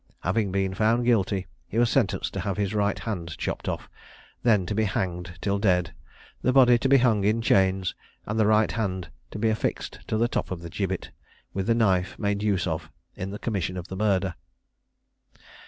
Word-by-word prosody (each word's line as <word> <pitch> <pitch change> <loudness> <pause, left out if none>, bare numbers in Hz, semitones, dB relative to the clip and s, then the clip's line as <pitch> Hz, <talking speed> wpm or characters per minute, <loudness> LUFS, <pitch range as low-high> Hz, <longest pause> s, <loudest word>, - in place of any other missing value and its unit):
Having 100 +2 0
been 95 0 0
found 115 +4 +2
guilty, 100 -5 +2 0.2
he 110 - -5
was 120 0 +3
sentenced 125 -8 +1
to - - -3
have 100 0 -2
his 100 -1 -1
right 105 -1 +1
hand 85 -7 -4
chopped - - -3
off, - - -4 0.5
then 105 -6 +3
to 105 - -2
be 110 +1 +1
hanged 90 -2 -3
till 100 0 0
dead, 90 -4 +2 0.5
the 130 - +2
body 125 -2 +6
to 135 - 0
be 140 - +7
hung 115 -5 +3
in 105 +3 +2
chains, 95 -4 +2 0.3
and 105 +2 -2
the 110 - +4
right 110 0 +4
hand 95 -7 -3 0.2
to - - -7
be 110 +1 +2
affixed 110 - -2
at 110 - +1
the 115 +2 +3
top - - -2
of 85 -2 -5
the 85 - -7
gibbet, 95 -1 -3 0.4
with 95 0 -2
the 115 - +4
knife 95 -5 +2
made 100 -1 -1
use 100 -4 +1
of 80 -3 -3 0.3
in 95 - -4
the 100 - -5
commission 100 -5 -2
of 90 0 -7
the 95 - -5
murder. 95 -2 +1
100 Hz, 200 wpm, -26 LUFS, 95-110 Hz, 0.5 s, be